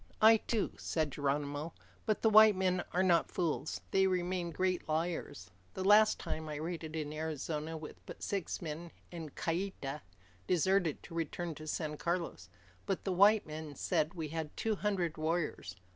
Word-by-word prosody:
"I 220 +1 +8
too," 220 0 -1
said 155 -3 -1
Geronimo, 145 +3 -2 0.3
"but 215 - +1
the 220 - +6
white 215 -1 +8
men 185 -1 +1
are 185 - +2
not 175 -3 +3
fools. 160 -4 -2
They 190 0 +4
remain 180 -1 0
great 180 0 -1
liars. 155 - -2 0.2
The 190 - -2
last 210 +2 +6
time, 155 0 -4
I 150 - -4
raided 160 0 -4
in 150 -1 -3
Arizona 155 0 -3
with 155 -1 -10
but - - -8
six 195 -2 -2
men, 165 +2 -5 0.2
and 160 -4 -7
Kieta 165 -5 -2 0.5
deserted 180 -2 +2
to 170 - -11
return 165 +1 -3
to 155 +1 -10
San 155 -1 -2
Carlos. 170 - -2 0.4
But 195 - -1
the 190 - -1
white 205 +3 +6
men 155 -1 -7
said 155 +5 0
we 160 -3 -4
had 160 -1 -5
two 225 - 0
hundred 185 -6 -1
warriors. 155 - -1
165 Hz, 165 wpm, -33 LUFS, 155-185 Hz, 0.5 s, I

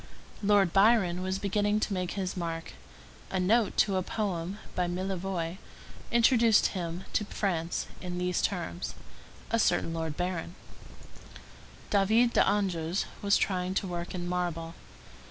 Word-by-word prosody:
Lord 200 -4 +3
Byron 195 -4 +4
was 190 +1 -1
beginning 205 +1 +1
to 210 - 0
make 180 -2 -2
his 190 -2 -3
mark; 165 -2 -4 0.6
a 190 - -1
note 215 +4 +2
to 195 -3 +3
a - - +1
poem 185 -2 -3 0.2
by 180 -1 0
Millevoye 185 -1 -3 0.5
introduced 235 -2 +5
him 175 -1 -4
to - - +2
France 175 -5 -2 0.2
in 180 -1 -4
these 180 0 0
terms: 175 -1 -3 0.6
a 230 - +2
certain 175 -5 +2
Lord 160 -2 -3
Baron. 180 -1 -3 1.4
David 220 +4 +4
d'Angers 185 -3 +1 0.2
was 200 0 +4
trying 185 -1 -1
to 195 - 0
work 175 0 -4
in 175 -1 -4
marble. 175 -2 -2
185 Hz, 135 wpm, -29 LUFS, 175-200 Hz, 1.4 s, introduced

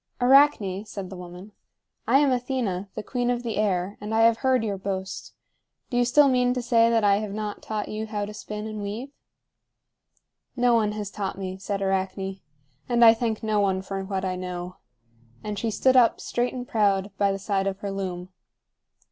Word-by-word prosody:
"Arachne," 245 -7 +4
said 200 -3 -7
the - - -6
woman, 180 +3 -10 0.6
"I - - +5
am 285 -1 +3
Athena, 240 -7 -2
the 215 - -4
queen 245 0 -1
of 245 0 -1
the 230 -2 -3
air, 195 -2 0
and 210 +1 -3
I 225 - +4
have 230 0 +5
heard 260 -1 +2
your 200 -3 -2
boast. 190 -1 -5 0.6
Do 245 - 0
you 245 - +3
still 285 +4 +5
mean 250 -1 +2
to 250 - -1
say 230 -1 +4
that 230 -2 +2
I 200 -1 +4
have 210 -1 -4
not 210 -1 -4
taught 215 -1 -4
you 215 +1 -4
how 210 -1 -3
to 210 - -8
spin 210 0 -6
and 215 -1 -5
weave?" 220 +7 -5 1.4
"No 245 -1 +3
one 215 -2 +2
has 210 -1 -5
taught 200 -2 -4
me," 190 -1 -5
said 200 0 -3
Arachne; 195 0 -2 0.5
"and 240 -1 +5
I 225 - +9
thank 225 -2 -2
no 215 -1 +1
one 190 -2 +1
for 195 0 -4
what 190 -1 -3
I 185 -1 -1
know;" 180 0 -6 0.7
and 210 -1 -4
she 230 - -1
stood 260 +4 +2
up, 245 -2 +5
straight 245 +1 -1
and 250 -1 -5
proud, 205 -5 +1
by 200 -1 +3
the 195 - -2
side 195 0 -1
of 195 -1 -2
her 200 - -3
loom. 185 -2 -4
210 Hz, 200 wpm, -25 LUFS, 195-235 Hz, 1.4 s, I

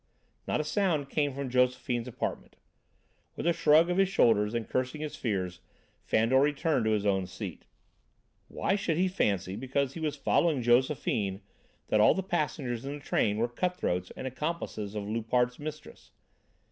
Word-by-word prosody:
Not - - 0
a - - 0
sound 155 -4 0
came 145 -2 +1
from 140 -2 -4
Josephine's 125 -1 +1
apartment. 125 - -5 0.8
With - - -5
a 170 - +4
shrug 155 +1 +5
of 180 - 0
his 195 -1 +4
shoulders 110 - +3
and 115 -1 -2
cursing 130 +4 -2
his 155 -1 -4
fears, 95 -6 -2 0.4
Fandor 115 +4 +3
returned 150 -2 +1
to 110 - +2
his 105 -1 0
own 95 -2 +1
seat. 90 - -7 0.8
Why - - -1
should 175 -6 -1
he 185 +2 +3
fancy, 100 - 0
because 135 +3 -1
he - - -7
was 155 -2 -1
following 145 -1 +1
Josephine, 120 -5 +1 0.5
that 105 - +4
all - - +6
the 190 - -2
passengers 145 -9 -2
in 140 +1 -4
the - - -8
train 105 -6 0
were 115 +2 +1
cut 180 +9 -2
throats 90 +1 -2
and - - -5
accomplices 130 -7 -4
of 105 - -2
Loupart's 120 +3 0
mistress? 155 0 -8
130 Hz, 170 wpm, -29 LUFS, 110-155 Hz, 0.8 s, all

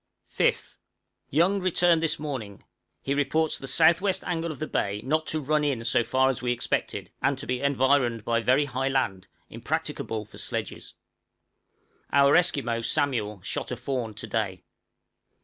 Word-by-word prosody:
5th. - - 0 0.5
Young 175 +7 +3
returned 175 -2 +3
this 165 - +2
morning; 130 -10 -6 0.4
he 135 - 0
reports 155 +2 +1
the 135 - -7
south 160 +5 +4
west 190 -2 0
angle 170 -1 -2
of 150 - -8
the 155 - -3
bay 100 -8 -1
not 155 +3 0
to 155 - -1
run 150 +1 +1
in 135 -6 -1
so 120 0 +2
far 130 +3 +2
as 125 - -6
we 125 -1 0
expected, 120 - -2
and 135 -1 +1
to 140 - -7
be 125 0 -2
environed 130 -4 +2
by 115 0 +1
very 130 +5 +3
high 135 0 -2
land, 100 -9 -1 0.2
impracticable 110 -1 -3
for - - -13
sledges. - - -5 1.2
Our 140 0 +5
Esquimaux, 135 -10 +2
Samuel, 115 - -1
shot - - -4
a 125 - -2
fawn 125 -3 -3
to 110 - -5
day. 105 -4 -2
135 Hz, 165 wpm, -26 LUFS, 115-155 Hz, 1.2 s, Our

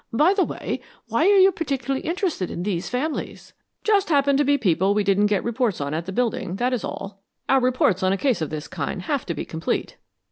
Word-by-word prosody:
By 300 +11 +4
the 395 -2 +2
way, - - -4 0.3
why - - +2
are 405 0 +6
you 385 0 +7
particularly 275 -6 -2
interested 340 - -1
in 175 - -4
these 185 -3 -2
families?" 285 +5 -4 0.3
"Just 410 -3 +2
happen 280 -2 +3
to 290 - +3
be 285 0 +3
people 190 - +2
we 210 - +2
didn't 200 +1 +3
get 205 -2 0
reports 235 -3 0
on 140 +1 -3
at 165 +3 -3
the - - -3
building, 220 -4 -1
that 245 +5 0
is 245 - -2
all. 195 0 -6 0.3
Our 270 - +4
reports 250 -7 +2
on 185 0 +2
a 195 - +1
case 255 -4 +1
of 155 - -2
this 155 -1 -5
kind 170 +2 -4
have 275 +5 -2
to 170 - -2
be - - -4
complete." 160 0 -3
235 Hz, 225 wpm, -23 LUFS, 190-285 Hz, 0.3 s, you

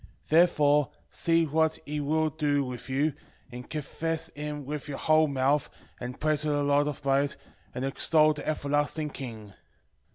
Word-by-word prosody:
Therefore 150 -4 +4 0.2
see 165 0 +2
what 160 +1 +1
he 150 +1 -3
will 155 +2 +1
do 145 -2 +1
with 125 -1 -7
you, 140 +3 +1 0.4
and 125 +1 -9
confess 165 +2 -3
him 150 -1 -6
with 150 +1 -5
your 140 -2 -5
whole 155 0 +4
mouth, 140 +1 +1 0.3
and 125 +1 -6
praise 155 -1 +1
the 145 -1 0
Lord 145 +1 +3
of 145 -1 -5
might, 140 +1 +2 0.4
and 130 - -2
extol 155 +3 +3
the 150 - -8
everlasting 145 0 -1
King. 110 -7 -8
145 Hz, 155 wpm, -28 LUFS, 140-155 Hz, 0.4 s, Therefore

